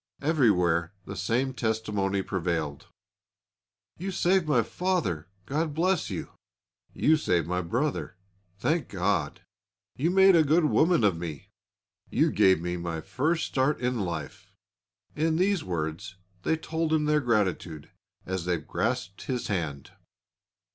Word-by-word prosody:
Everywhere 90 - +2
the 100 - -7
same 125 +8 0
testimony 105 -5 -1
prevailed: 85 -6 -2 1.1
"You 190 +3 -3
saved 185 -2 +2
my 125 -6 +3
father, 165 - -1 0.2
God 150 +3 -1
bless 185 +3 +1
you!" - - -5 0.6
"You 155 +1 +3
saved 90 - +1
my 90 +1 0
brother, 125 - -2 0.4
thank 155 - 0
God!" 90 -6 -1 0.5
"You 155 +6 +1
made 190 0 +6
a 165 - +6
good 155 +3 +3
woman 160 -2 +3
of 100 -4 +4
me!" 80 -4 -7 0.6
"You - - +2
gave 95 -3 +4
me 90 +1 -3
my 85 -2 -4
first 155 - -1
start 135 +2 +1
in 125 -1 -1
life!" 85 -6 -5 0.6
In 160 +1 +1
these 185 0 +2
words 85 +2 -4 0.3
they 160 - +1
told 160 0 -2
him 155 -1 +2
their 150 0 +3
gratitude, 95 - -1 0.3
as 95 -2 -3
they 90 -1 +1
grasped 100 +5 -3
his 125 -3 -2
hand. 80 -8 -3
110 Hz, 135 wpm, -27 LUFS, -, 1.1 s, made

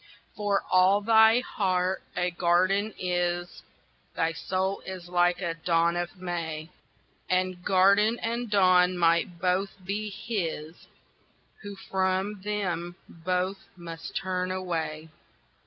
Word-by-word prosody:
For 205 -1 0
all 185 +2 +5
thy 220 +2 +5
heart 185 -5 -1 0.2
a 180 0 +1
garden 185 +5 +2
is, 175 -1 -2 0.5
Thy 165 0 +1
soul 190 +3 -2
is 185 -2 -8
like 175 0 +2
a 170 -2 -1
dawn 165 0 +1
of 175 +2 -4
May. 165 -3 -4 0.6
And 185 -1 0
garden 200 +4 +4
and 235 +1 -3
dawn 185 -2 +4
might 170 +1 +2
both 185 +2 0
be 210 +2 -3
his, 190 -7 -5 0.7
Who 205 -1 -8
from 190 +1 -1
them 180 -4 -3
both 185 +3 -3
must 165 -1 -8
turn 185 -1 -2
away. 165 -4 -3
185 Hz, 115 wpm, -27 LUFS, 175-200 Hz, 0.7 s, all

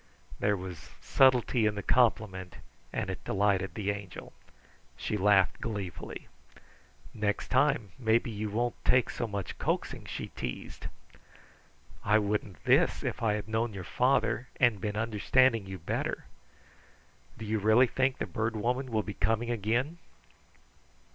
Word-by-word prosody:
There 105 0 +2
was 90 -2 -8
subtlety 125 -3 +3
in 105 - 0
the 100 - -4
compliment 105 -7 +1 0.4
and - - -2
it 95 - -7
delighted 95 -1 +1
the 100 -2 -1
Angel. 100 -2 -8 0.6
She - - -2
laughed 100 -2 +3
gleefully. 100 -7 -5 0.9
"Next 105 -1 -1
time, 130 -6 +2
maybe 115 0 +2
you 105 0 -3
won't 120 +4 -2
take 130 -2 +3
so 120 - -3
much 100 -3 -5
coaxing," - - -2
she - - -5
teased. 60 -2 -6 1.2
"I 105 +1 +4
wouldn't 105 -2 -2
this, - - +3
if - - -3
I 110 -2 +2
had 105 +1 -3
known 110 0 -1
your 95 - -5
father 125 +4 +1
and 120 -5 +3
been 105 -1 -2
understanding 115 +1 +2
you 95 0 -6
better. 80 - -3 1.1
Do 110 - -7
you 110 +1 0
really 110 +5 +5
think 130 +1 0
the - - -2
Bird 110 -1 -2
Woman 125 +4 -1
will 110 -2 0
be 105 - -5
coming 115 +3 0
again?" 120 - -1
110 Hz, 140 wpm, -30 LUFS, 100-120 Hz, 1.2 s, really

